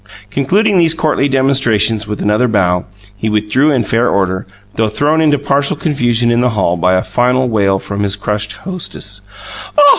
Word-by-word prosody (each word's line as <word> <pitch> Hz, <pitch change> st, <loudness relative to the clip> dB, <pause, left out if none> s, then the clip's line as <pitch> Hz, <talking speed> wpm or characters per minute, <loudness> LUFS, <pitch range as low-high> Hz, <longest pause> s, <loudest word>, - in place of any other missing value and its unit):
Concluding 190 Hz, -, +1 dB
these 165 Hz, -1 st, +3 dB
courtly 150 Hz, -3 st, 0 dB
demonstrations 120 Hz, -6 st, +2 dB
with 105 Hz, 0 st, -4 dB
another 105 Hz, +4 st, +2 dB
bow 90 Hz, -5 st, +1 dB, 0.3 s
he 110 Hz, +2 st, -3 dB
withdrew 105 Hz, +7 st, +1 dB
in 130 Hz, -4 st, +1 dB
fair 115 Hz, +3 st, +1 dB
order, 95 Hz, -1 st, -1 dB, 0.3 s
though 110 Hz, -1 st, 0 dB
thrown 150 Hz, +7 st, +1 dB
into 150 Hz, -2 st, +3 dB
partial 140 Hz, +1 st, 0 dB
confusion 120 Hz, -6 st, +1 dB
in 120 Hz, +1 st, +2 dB
the 125 Hz, -, +2 dB
hall 95 Hz, -6 st, 0 dB
by 90 Hz, +1 st, +1 dB
a 95 Hz, -, +1 dB
final 125 Hz, +1 st, +1 dB
wail 100 Hz, -4 st, +1 dB
from 100 Hz, +1 st, -5 dB
his 100 Hz, -1 st, 0 dB
crushed 105 Hz, +1 st, -3 dB
hostess: 180 Hz, -, -6 dB, 0.6 s
"Oh! 290 Hz, -1 st, +7 dB
120 Hz, 175 wpm, -14 LUFS, 105-140 Hz, 0.6 s, Oh